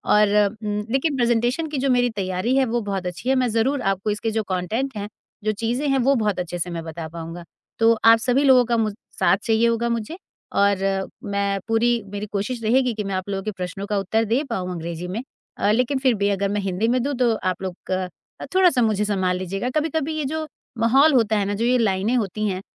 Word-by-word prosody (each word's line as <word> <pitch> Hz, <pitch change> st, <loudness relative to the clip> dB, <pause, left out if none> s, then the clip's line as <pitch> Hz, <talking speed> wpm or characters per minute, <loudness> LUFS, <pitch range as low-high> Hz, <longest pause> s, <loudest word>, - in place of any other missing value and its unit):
और 210 Hz, 0 st, +5 dB, 0.3 s
उम, 210 Hz, 0 st, -2 dB
लेकिन 275 Hz, +3 st, +1 dB
प्रेज़ेंटेशन 240 Hz, +5 st, +1 dB
की 295 Hz, -, -3 dB
जो 275 Hz, +1 st, 0 dB
मेरी 245 Hz, -1 st, +3 dB
तैयारी 185 Hz, +7 st, -1 dB
है, 270 Hz, -, +4 dB
वो 240 Hz, 0 st, -1 dB
बहुत 195 Hz, -3 st, -3 dB
अच्छी 180 Hz, +8 st, -4 dB
है। 265 Hz, -, +4 dB
मैं 255 Hz, -1 st, +2 dB
ज़रूर 240 Hz, +5 st, +1 dB
आपको 195 Hz, +2 st, -3 dB
इसके 215 Hz, +2 st, -2 dB
जो 220 Hz, 0 st, -1 dB
कॉन्टेंट 220 Hz, +8 st, -2 dB
हैं, 205 Hz, 0 st, -4 dB, 0.4 s
जो 215 Hz, -, +1 dB
चीज़ें 245 Hz, +6 st, 0 dB
हैं, 270 Hz, -, +3 dB
वो 270 Hz, +3 st, +3 dB
बहुत 210 Hz, -5 st, 0 dB
अच्छे 175 Hz, 0 st, -4 dB
से 175 Hz, -, -2 dB
मैं 170 Hz, -1 st, -5 dB
बता 160 Hz, 0 st, -6 dB
पाऊँगा। 165 Hz, +1 st, -7 dB, 0.4 s
तो 225 Hz, 0 st, +5 dB
आप 225 Hz, 0 st, +8 dB
सभी 255 Hz, +4 st, +2 dB
लोगों 260 Hz, -3 st, +6 dB
का 235 Hz, 0 st, +1 dB
मुज़ 215 Hz, -2 st, 0 dB, 0.2 s
साथ -, -, +4 dB
चाहिए 225 Hz, 0 st, +3 dB
होगा 230 Hz, 0 st, 0 dB
मुझे 235 Hz, +8 st, -3 dB, 0.4 s
और 195 Hz, -1 st, +2 dB, 0.2 s
मैं 200 Hz, -1 st, -1 dB
पूरी 235 Hz, +1 st, +2 dB
मेरी 205 Hz, 0 st, -4 dB
कोशिश 225 Hz, +4 st, -3 dB
रहेगी 250 Hz, +2 st, +2 dB
कि 215 Hz, -1 st, -3 dB
मैं 195 Hz, -1 st, -3 dB
आप 185 Hz, +1 st, -4 dB
लोगों 195 Hz, -1 st, -3 dB
के 215 Hz, -, -2 dB
प्रश्नों 190 Hz, 0 st, -5 dB
का 205 Hz, -, 0 dB
उत्तर 220 Hz, +4 st, 0 dB
दे 235 Hz, +7 st, +1 dB
पाऊँ 185 Hz, -6 st, -3 dB
अंग्रेज़ी 170 Hz, 0 st, -5 dB
में। 205 Hz, +7 st, -4 dB, 0.3 s
अ, 205 Hz, -, +2 dB
लेकिन 250 Hz, +5 st, +1 dB
फिर 260 Hz, -2 st, +3 dB
भी 200 Hz, 0 st, +1 dB
अगर 200 Hz, 0 st, 0 dB
मैं 205 Hz, +1 st, -1 dB
हिंदी 195 Hz, +3 st, -1 dB
में 250 Hz, +2 st, +2 dB
दूँ 285 Hz, +2 st, -1 dB
तो 235 Hz, -2 st, +3 dB
आप 185 Hz, -4 st, -2 dB
लोग 185 Hz, 0 st, -7 dB
अ, 185 Hz, 0 st, 0 dB, 0.5 s
थोड़ा-सा 360 Hz, -9 st, +5 dB
मुझे 215 Hz, -3 st, +2 dB
संभाल 190 Hz, -3 st, 0 dB
लीजिएगा।" 195 Hz, +6 st, -3 dB
कभी-कभी 315 Hz, 0 st, -1 dB
ये 305 Hz, -, -1 dB
जो 315 Hz, +3 st, -3 dB, 0.3 s
माहौल 270 Hz, +7 st, +5 dB
होता 225 Hz, -4 st, +3 dB
है 200 Hz, -, +1 dB
ना, 200 Hz, -, -1 dB
जो 225 Hz, +3 st, -1 dB
ये 250 Hz, +1 st, +3 dB
लाइनें 210 Hz, 0 st, +1 dB
होती 215 Hz, -1 st, -1 dB
हैं, 185 Hz, -1 st, -3 dB
220 Hz, 230 wpm, -22 LUFS, 195-245 Hz, 0.5 s, आप